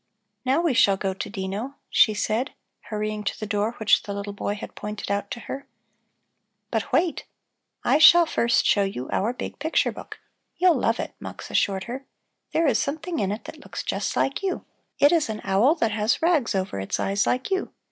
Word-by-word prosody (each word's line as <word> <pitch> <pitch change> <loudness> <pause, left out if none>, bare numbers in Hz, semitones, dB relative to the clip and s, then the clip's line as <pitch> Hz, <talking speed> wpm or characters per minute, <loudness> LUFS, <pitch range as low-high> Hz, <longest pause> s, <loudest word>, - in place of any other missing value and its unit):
"Now 265 +5 +2
we 335 -5 +2
shall 200 -5 +4
go 190 0 -1
to 190 - -5
Dino," 200 +6 -4
she 215 - +4
said, 220 +5 -1 0.3
hurrying 215 0 -3
to 200 - -3
the 215 - -3
door 210 +2 0
which 220 -3 +3
the 200 - -6
little 200 0 -5
boy 205 0 -2
had 205 - -8
pointed 210 -1 -5
out 200 0 -1
to 235 - -6
her. 275 +1 -7 1.0
"But - - -2
wait! 335 0 +1 0.6
I 295 - +3
shall 340 +2 +9
first 235 -6 +2
show 205 - +4
you 195 -10 -3
our 215 +5 +1
big 250 - -7
picture 315 +3 +1
book. - - -10 0.4
You'll 360 -1 +5
love - - +1
it," - - -4
Mux - - -8
assured 190 -1 +1
her. 255 +5 -7 0.4
"There 330 - +2
is 280 - +3
something 315 +4 -2
in 195 -1 0
it 210 - -4
that - - -10
looks - - -7
just - - -2
like 270 - 0
you; 385 -2 -2 0.3
it 285 - +6
is 330 -8 +2
an 215 -1 -3
owl 205 +11 +3
that 230 -9 0
has 210 +2 +1
rags 320 - +2
over 190 - -2
its 95 - -2
eyes 200 +1 +1
like 255 +8 0
you. 380 0 -1
220 Hz, 200 wpm, -25 LUFS, 200-285 Hz, 1.0 s, shall